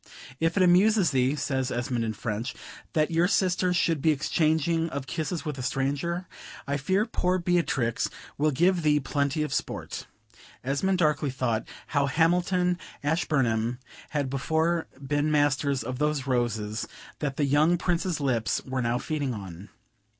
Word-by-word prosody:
"If 165 +3 +1
it 185 - +5
amuses 185 0 +5
thee," 130 +2 +2
says 130 -3 -1
Esmond 120 -1 -1
in 110 -1 -2
French, 110 +3 -4 0.4
"that 155 0 +2
your 165 +2 +3
sister 185 -1 +2
should 165 -4 +1
be 160 - +3
exchanging 160 +2 +1
of 140 -3 -4
kisses 155 +4 -3
with 150 -3 -4
a - - -3
stranger, 145 +7 -1 0.4
I 140 +1 0
fear 190 +9 +1
poor 185 -5 0
Beatrix 170 -10 0 0.3
will 155 +2 +2
give 175 +5 +2
thee 150 -1 +3
plenty 140 +2 0
of 150 -3 -3
sport." - - -4 0.6
Esmond 145 +9 +1
darkly 150 -3 +2
thought, 125 -4 -1 0.2
how 140 -2 +2
Hamilton, 180 +4 +2 0.2
Ashburnham, 130 -7 +1 0.3
had 145 -2 -1
before 160 +5 0 0.2
been 145 +2 +1
masters 145 -3 +2
of 125 +2 -5
those 150 -2 0
roses 115 -4 -1 0.3
that 140 -3 -2
the 145 - +2
young 150 +5 +3
Prince's 175 -1 -1
lips 125 -6 0
were 130 -1 -2
now 120 0 +1
feeding 140 -2 -2
on. 95 -1 -9
145 Hz, 150 wpm, -27 LUFS, 130-170 Hz, 0.6 s, it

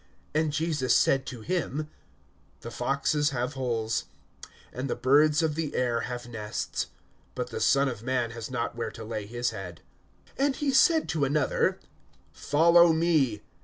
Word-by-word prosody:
(58)And 155 0 +1
Jesus 150 -3 +1
said 135 -1 +3
to 120 -3 -7
him: 155 -1 -2 0.7
The 115 - -8
foxes 140 +4 0
have 125 0 -2
holes, 115 -4 -2 0.7
and 130 +2 -4
the - - -1
birds 150 +4 +4
of 160 -2 +1
the 155 -1 -3
air 120 -2 +1
have 120 -1 -6
nests; 110 -3 -4 0.5
but - - -4
the - - -4
Son 140 0 +3
of 120 -5 -4
man 125 -1 -1
has 115 0 -7
not 120 -2 -3
where 115 -1 -3
to 110 - -10
lay 110 -2 -5
his 120 +2 -2
head. 90 -6 -8 0.6
(59)And 275 0 +2
he 290 -2 0
said 320 +4 +4
to 155 -3 0
another: 145 +2 +1 0.6
Follow 170 +3 +5
me. 155 -10 +1
135 Hz, 160 wpm, -27 LUFS, 120-155 Hz, 0.7 s, Follow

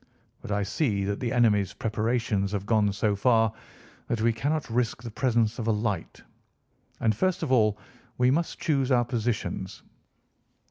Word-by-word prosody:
But - - -7
I 105 0 +1
see 105 - 0
that 100 +1 -2
the 120 - -2
enemy's 110 -6 +2
preparations 110 -2 -1
have 100 -1 -2
gone 105 -2 +2
so 100 +1 0
far 110 0 +3 0.5
that 120 - -1
we 115 +1 +2
cannot 145 +6 -1
risk 115 0 -1
the 115 - -6
presence 115 -2 +1
of 115 - -3
a - - +4
light. 105 -4 -3 0.8
And, 110 -2 +2
first 185 - 0
of 145 - -2
all, 110 -5 +3 0.4
we 125 +1 +4
must 165 +4 -1
choose 140 -4 0
our 120 -1 +4
positions. 110 -5 -3
115 Hz, 165 wpm, -27 LUFS, 105-125 Hz, 0.8 s, a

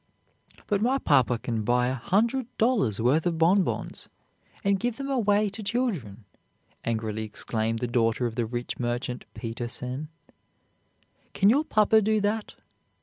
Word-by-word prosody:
"But 205 -1 0
my 255 +4 +2
papa 125 - +3
can 115 -1 -3
buy 120 +3 +2
a - - -1
hundred 225 - +1
dollars' 220 - +2
worth 140 +9 +2
of 170 -2 -1
bonbons, 180 +4 +1 0.5
and 200 -1 +2
give 240 +1 -2
them 275 0 -4
away 210 -5 +2
to 200 - -7
children," 185 - -2 0.6
angrily 110 -1 -2
exclaimed 110 +1 -2
the 125 - -2
daughter 115 0 +1
of 115 - -2
the 115 -1 -1
rich 120 +1 -4
merchant 120 +1 -3
Peter_sen_. 120 +5 -4 1.3
"Can 200 +2 +5
your 285 +5 +3
papa 220 -2 +4
do 215 +1 +2
that?" 210 +1 -2
135 Hz, 145 wpm, -27 LUFS, -, 1.3 s, Can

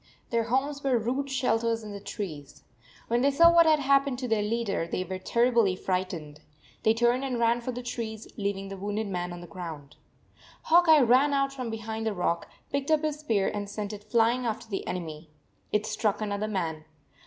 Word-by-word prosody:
Their 230 -1 +1
homes 275 +4 -1
were 265 -3 +3
rude 260 +5 -2
shelters 230 -3 0
in 210 - -7
the 200 - -6
trees. 160 -8 -7 0.4
When 235 +1 +1
they 275 - +4
saw 335 +4 +6
what 335 -1 +6
had 310 -1 +6
happened 275 -2 +2
to 255 0 -3
their 220 -2 +1
leader, 210 -5 -1
they 185 - -2
were 185 0 -5
terribly 235 -1 +2
frightened. 180 -6 -3 0.4
They 220 0 +3
turned 240 +3 +2
and 260 -3 -2
ran 235 +1 +2
for 255 - -3
the 245 0 -6
trees, 225 -3 -5
leaving 200 -2 -3
the 195 - -6
wounded 205 +3 -2
man 180 -3 -3
on 175 0 -7
the - - -9
ground. 160 -5 -8 0.7
Hawk 345 +1 +5
Eye 310 -2 +8
ran 260 +4 +4
out 275 0 +1
from 255 -3 -4
behind 220 0 -4
the 215 - -1
rock, 175 -1 -1 0.2
picked 280 +1 -2
up 310 -1 +3
his 305 -1 -1
spear, 220 -10 +1
and 205 -1 -4
sent 205 0 -4
it 205 0 -8
flying 235 +2 +3
after 230 0 -3
the 200 -3 -4
enemy. 160 -3 -5 0.4
It 210 0 +1
struck 215 -1 0
another 210 0 -2
man. 165 -7 -3
225 Hz, 200 wpm, -28 LUFS, 195-255 Hz, 0.7 s, Eye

